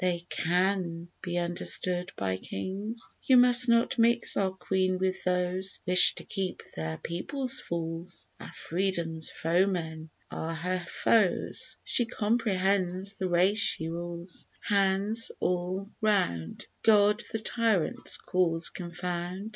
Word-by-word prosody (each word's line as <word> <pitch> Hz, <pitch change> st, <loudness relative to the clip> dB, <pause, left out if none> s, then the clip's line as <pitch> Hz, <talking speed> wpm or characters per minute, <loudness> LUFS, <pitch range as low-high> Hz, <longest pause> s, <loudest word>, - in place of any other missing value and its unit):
They 175 Hz, -2 st, 0 dB
can 175 Hz, -1 st, 0 dB
be 175 Hz, -1 st, -3 dB
understood 175 Hz, +1 st, -2 dB
by 95 Hz, -1 st, -1 dB
kings. 200 Hz, -, -6 dB
You 260 Hz, -, +5 dB
must 245 Hz, 0 st, +6 dB
not 235 Hz, +2 st, +3 dB
mix 235 Hz, +1 st, +3 dB
our 195 Hz, -1 st, +2 dB
Queen 185 Hz, 0 st, 0 dB
with 185 Hz, 0 st, -1 dB
those 180 Hz, +1 st, -1 dB
That 180 Hz, -, -1 dB
wish 180 Hz, -, +8 dB
to -, -, -8 dB
keep 190 Hz, -3 st, -4 dB
their 80 Hz, 0 st, -3 dB
people 260 Hz, -, -4 dB
fools; 170 Hz, -7 st, -3 dB
Our -, -, -9 dB
freedom's 170 Hz, -3 st, -2 dB
foemen 165 Hz, -2 st, -1 dB, 0.2 s
are 165 Hz, +1 st, -4 dB
her 180 Hz, +3 st, -1 dB
foes, 210 Hz, -6 st, +1 dB
She 240 Hz, -, 0 dB
comprehends 200 Hz, -4 st, 0 dB
the 190 Hz, -2 st, -3 dB
race 185 Hz, +5 st, +3 dB
she 160 Hz, -5 st, 0 dB
rules. 170 Hz, +1 st, -7 dB
Hands 200 Hz, +3 st, +1 dB
all 180 Hz, +3 st, -2 dB
round! 185 Hz, -, 0 dB, 0.2 s
God 210 Hz, 0 st, +5 dB
the 225 Hz, -, -1 dB
tyrant's 220 Hz, -5 st, 0 dB
cause 170 Hz, -2 st, 0 dB
confound! 175 Hz, +2 st, -4 dB
185 Hz, 125 wpm, -29 LUFS, 170-205 Hz, 0.2 s, wish